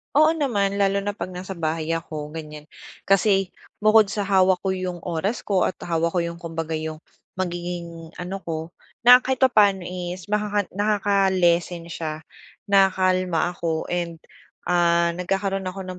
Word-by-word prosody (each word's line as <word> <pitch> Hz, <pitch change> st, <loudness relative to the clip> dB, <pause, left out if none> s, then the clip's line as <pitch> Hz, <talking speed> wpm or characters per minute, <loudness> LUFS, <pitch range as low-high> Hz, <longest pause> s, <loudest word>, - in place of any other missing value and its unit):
Oo 310 Hz, +2 st, +6 dB
naman, 210 Hz, -11 st, 0 dB
lalo 200 Hz, 0 st, +2 dB
na 205 Hz, -, -1 dB
pag 205 Hz, -, -5 dB
nasa 185 Hz, 0 st, -7 dB
bahay 160 Hz, 0 st, -2 dB
ako 155 Hz, -2 st, -4 dB
ganyan. 150 Hz, -1 st, -9 dB, 0.3 s
Kasi 195 Hz, -1 st, +2 dB, 0.3 s
bukod 215 Hz, 0 st, +6 dB
sa 205 Hz, +1 st, -3 dB
hawak 190 Hz, -2 st, +3 dB
ko 195 Hz, -, 0 dB
yung 185 Hz, -2 st, -4 dB
oras 180 Hz, +6 st, -2 dB
ko 195 Hz, -3 st, +1 dB
at -, -, -2 dB
hawak 165 Hz, 0 st, -1 dB
ko 175 Hz, -, +2 dB
yung 170 Hz, 0 st, -5 dB
kumbaga 165 Hz, -1 st, -5 dB
yung 155 Hz, 0 st, -6 dB, 0.3 s
magiging 175 Hz, -2 st, -5 dB
ano 180 Hz, +2 st, -5 dB
ko, 160 Hz, 0 st, -4 dB, 0.3 s
na 245 Hz, +1 st, +9 dB
kahit 260 Hz, +1 st, -3 dB
papaano 205 Hz, -7 st, +4 dB
is 180 Hz, +1 st, -6 dB
makaka 210 Hz, -2 st, 0 dB
nakaka-lessen 190 Hz, -4 st, +1 dB
siya 155 Hz, -1 st, -5 dB, 0.5 s
nakakalma 185 Hz, -3 st, +3 dB
ako 165 Hz, -2 st, -3 dB
and, 175 Hz, -1 st, -2 dB, 0.5 s
ah, 170 Hz, -1 st, +3 dB
nagkakaroon 195 Hz, +1 st, -1 dB
ako 195 Hz, +1 st, -6 dB
ng 185 Hz, -1 st, -8 dB
185 Hz, 150 wpm, -23 LUFS, 170-195 Hz, 0.5 s, na